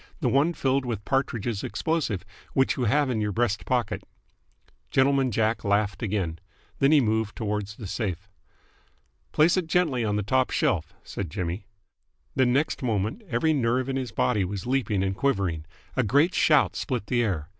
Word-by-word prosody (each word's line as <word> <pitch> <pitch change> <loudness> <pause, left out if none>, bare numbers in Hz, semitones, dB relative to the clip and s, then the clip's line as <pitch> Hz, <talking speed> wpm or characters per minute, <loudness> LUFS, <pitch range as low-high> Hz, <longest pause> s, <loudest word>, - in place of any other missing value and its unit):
The - - +1
one 150 +5 +2
filled 135 -1 +1
with 115 -5 -4
Partridge's 120 -6 -1
explosive, 110 - -1 0.3
which 135 0 +2
you 125 - -1
have 140 +4 +2
in 110 -3 -1
your 105 -1 0
breast 110 -1 0
pocket." 125 -4 0 0.9
Gentleman 135 0 +3
Jack 110 0 0
laughed 100 0 +1
again. 95 -7 -2 0.4
Then 135 +1 +4
he 155 - +7
moved 110 -3 0
towards 105 -2 -3
the 110 - -8
safe. 95 -2 -3 1.0
"Place 165 +5 +4
it 180 -3 0
gently 160 -8 +1
on 105 -2 0
the 105 - 0
top 130 +5 +2
shelf," 80 -3 0
said 95 -5 -5
Jimmy. 90 +5 -4 0.7
The 130 -2 +3
next 140 +5 +1
moment 110 - -1
every 160 0 +2
nerve 130 -1 +1
in 135 - -1
his 130 -4 -3
body 110 -2 +1
was 95 0 -4
leaping 120 -6 0
and 95 0 -1
quivering. 95 - 0 0.3
A 130 - +3
great 140 - +3
shout 150 -3 +4
split 125 -6 -2
the 120 0 +1
air. 90 -9 -1
115 Hz, 170 wpm, -26 LUFS, 100-135 Hz, 1.0 s, he